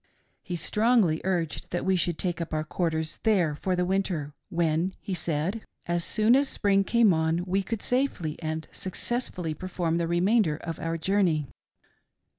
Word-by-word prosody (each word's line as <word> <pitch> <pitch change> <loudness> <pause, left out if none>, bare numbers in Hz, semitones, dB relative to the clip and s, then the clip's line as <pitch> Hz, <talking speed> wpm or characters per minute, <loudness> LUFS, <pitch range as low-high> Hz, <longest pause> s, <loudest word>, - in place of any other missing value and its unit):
He 180 - -5
strongly 210 -3 +2
urged 175 -5 -2
that 175 - -2
we 190 0 +3
should 175 -2 0
take 175 -2 -2
up 165 -1 -3
our 155 - 0
quarters 160 -1 -2
there 185 -9 +2
for 185 +5 -1
the 180 0 +1
Winter, 180 -6 -1 0.2
when, 170 +1 0
he 195 - -5
said, 170 +5 -1 0.2
as 175 0 0
soon 220 +6 +3
as 275 +1 +3
Spring 195 -1 +2
came 225 -2 +4
on, 160 +2 +1
we 190 +2 +1
could 220 +2 -4
safely 250 - +1
and 160 0 -3
successfully 185 -4 -1
perform 170 0 -2
the 170 - 0
remainder 175 -1 +2
of 165 0 -6
our 165 0 -2
journey. 170 -4 +1
175 Hz, 165 wpm, -27 LUFS, 160-195 Hz, 0.2 s, came